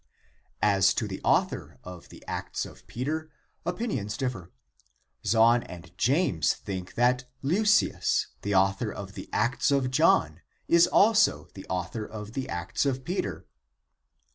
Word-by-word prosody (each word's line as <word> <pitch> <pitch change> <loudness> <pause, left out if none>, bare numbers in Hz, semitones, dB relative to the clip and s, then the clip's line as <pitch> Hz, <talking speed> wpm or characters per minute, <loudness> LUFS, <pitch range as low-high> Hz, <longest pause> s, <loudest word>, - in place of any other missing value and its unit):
As 100 -2 +4
to - - -1
the - - -6
author - - 0
of 90 -1 -10
the - - -14
Acts - - -4
of - - -14
Peter, 155 +6 -3 0.4
opinions 175 - -2
differ. 120 -11 -3 0.7
Zahn 115 +1 +4
and 90 -4 -11
James 120 - +2
think 95 -2 -7
that 125 +2 +2 0.2
Leucius, 210 +9 +2
the 100 -1 -1
author 95 +3 +2
of 100 -1 -8
the - - -9
Acts 120 +6 +1
of 135 -3 +1
John, 90 - +3 0.3
is 170 0 +5
also 220 +1 +3
the 95 - -10
author 90 +5 -3
of 105 0 -8
the 135 0 -4
Acts 85 -1 -2
of 130 -1 -1
Peter. 180 +8 -3
115 Hz, 140 wpm, -27 LUFS, 95-140 Hz, 0.7 s, is